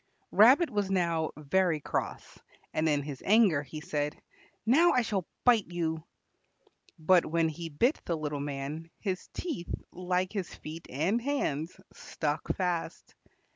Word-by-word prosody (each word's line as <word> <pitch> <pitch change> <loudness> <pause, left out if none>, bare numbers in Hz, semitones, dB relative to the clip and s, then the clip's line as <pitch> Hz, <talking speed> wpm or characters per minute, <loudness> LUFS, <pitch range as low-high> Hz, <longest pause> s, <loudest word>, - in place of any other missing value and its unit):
Rabbit 260 - +6
was 205 -2 0
now 170 -4 +1
very 165 +2 +1
cross, - - -4 0.3
and 155 0 +1
in 145 -1 +1
his 140 -2 -7
anger 200 -8 +5
he 150 +2 -8
said, 150 -1 -2 0.5
"Now 320 +10 +5
I 250 - +3
shall 195 -6 -2 0.2
bite 235 -5 +4
you," 160 -2 -2 0.9
but 175 +2 +4
when 165 +1 +1
he 165 +2 -6
bit 235 - +1
the 170 - -1
little 150 -2 -3
man, 145 +3 -4
his 190 -3 -3
teeth, 300 - -4 0.2
like 180 +1 -1
his 195 -5 -4
feet 160 +2 -9
and 175 - 0
hands, 180 - -2
stuck 150 -1 -3
fast. 180 -3 -2
170 Hz, 140 wpm, -30 LUFS, 155-200 Hz, 0.9 s, Rabbit